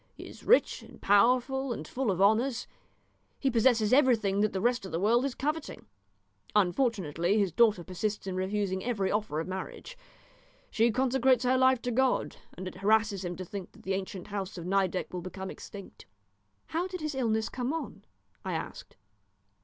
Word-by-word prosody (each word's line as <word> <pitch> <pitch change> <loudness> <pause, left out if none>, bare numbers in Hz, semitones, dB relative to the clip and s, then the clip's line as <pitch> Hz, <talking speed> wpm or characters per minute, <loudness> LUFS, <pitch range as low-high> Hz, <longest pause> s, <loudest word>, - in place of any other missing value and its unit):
He - - -10
is - - -12
rich - - +3
and - - -15
powerful 250 +6 +3
and 155 -9 -5
full 260 -3 -2
of 185 -2 0
honours. 230 +5 +3 0.7
He 270 - +1
possesses 230 -2 +3
everything 230 -8 +3
that 215 0 +2
the 190 - -2
rest 240 +2 +1
of 190 - -7
the 165 - -1
world 230 +6 +3
is 275 - -3
coveting. 300 +3 -3 0.7
Unfortunately 190 - +1
his 200 -4 +2
daughter 210 -1 +3
persists 205 +4 -3
in 190 -1 -3
refusing 190 0 -1
every 205 -6 -1
offer 210 -7 -1
of 160 - -3
marriage. 190 - -6 0.8
She 230 +1 +3
consecrates 255 +1 +2
her 255 +1 +3
life 260 -1 +3
to 245 - -1
God, 260 +2 +1 0.2
and 185 +1 -5
it 185 - -8
harasses 210 0 +2
him 175 -1 -4
to 185 - -6
think 195 0 -7
that - - -17
the 190 - -1
ancient 190 0 -5
house 195 -2 -4
of 170 - -6
Nideck 190 -1 0
will 180 - -3
become 190 +2 -6
extinct." 200 -2 -11 0.6
"How 340 +3 -1
did 365 -2 -6
his 305 -1 -2
illness 225 -4 0
come 250 +2 -3
on?" 295 -10 -5 0.4
I - - -3
asked. - - -6
215 Hz, 180 wpm, -29 LUFS, 190-250 Hz, 0.8 s, rich